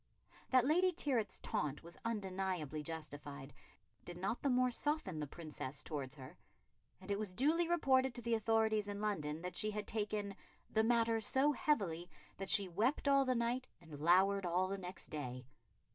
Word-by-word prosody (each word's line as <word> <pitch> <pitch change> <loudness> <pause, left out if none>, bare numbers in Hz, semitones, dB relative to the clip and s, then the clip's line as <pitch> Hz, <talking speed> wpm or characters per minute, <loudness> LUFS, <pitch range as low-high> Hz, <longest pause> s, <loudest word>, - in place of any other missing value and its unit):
That 255 -2 +5
Lady 360 +6 +4
Tyrwhitt's 265 -10 0
taunt 150 0 -2
was 170 +1 -10
undeniably 190 -8 -2
justified 145 -3 -6 0.5
did 175 0 -8
not 195 +6 -2
the 280 - +1
more 250 0 +3
soften 270 - 0
the 150 - -3
Princess 150 -3 -6
towards 140 -3 -4
her, 140 +5 -11 0.6
and 190 +2 -7
it 200 - 0
was 200 -4 -4
duly 325 - +2
reported 265 -6 +3
to 240 - -5
the 235 0 0
authorities 220 -1 +2
in 205 0 -4
London 165 -7 -2
that 180 - -5
she 215 - +2
had 210 -1 -3
taken 205 -2 -2 0.4
"the 220 - +3
matter 230 -1 +3
so 265 +7 +3
heavily 195 - 0 0.3
that 195 0 -3
she 200 -2 +5
wept 225 - 0
all 275 -1 +5
that 255 -1 +1
night 240 +2 0
and 160 -4 -11
lowered 190 +5 +4
all 180 +1 +1
the 195 +1 -3
next 180 0 -8
day.... 125 -4 -5
200 Hz, 175 wpm, -37 LUFS, 170-240 Hz, 0.6 s, That